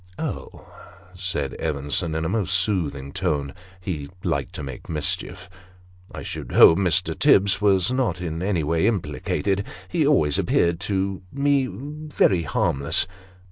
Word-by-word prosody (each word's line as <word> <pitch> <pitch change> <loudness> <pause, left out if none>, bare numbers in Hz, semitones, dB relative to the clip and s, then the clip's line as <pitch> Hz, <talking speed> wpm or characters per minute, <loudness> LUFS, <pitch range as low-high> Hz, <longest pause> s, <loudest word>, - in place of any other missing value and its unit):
"Oh," - - -6 0.5
said 90 -7 -3
Evenson, 75 +2 -1
in 80 0 -1
a - - +1
most 95 -1 0
soothing 80 -8 -1
tone 70 -2 -1 0.3
he 80 -6 -5
liked - - -1
to - - -5
make 70 -2 -8
mischief 75 -2 -2 0.3
" 90 0 -26
I - - -7
should - - -6
hope 80 - +8
Mr. 90 0 +2
Tibbs 100 -9 +4
was 100 0 +3
not 125 -9 0
in 85 -2 -4
any 90 -4 0
way 80 +5 +1
implicated. 100 0 -1 0.3
He 150 - +1
always 75 - +3
appeared 85 -1 +2
to 95 0 -2
me 140 -1 +2
very 145 - 0
harmless." 75 0 0
90 Hz, 140 wpm, -23 LUFS, 80-100 Hz, 0.5 s, hope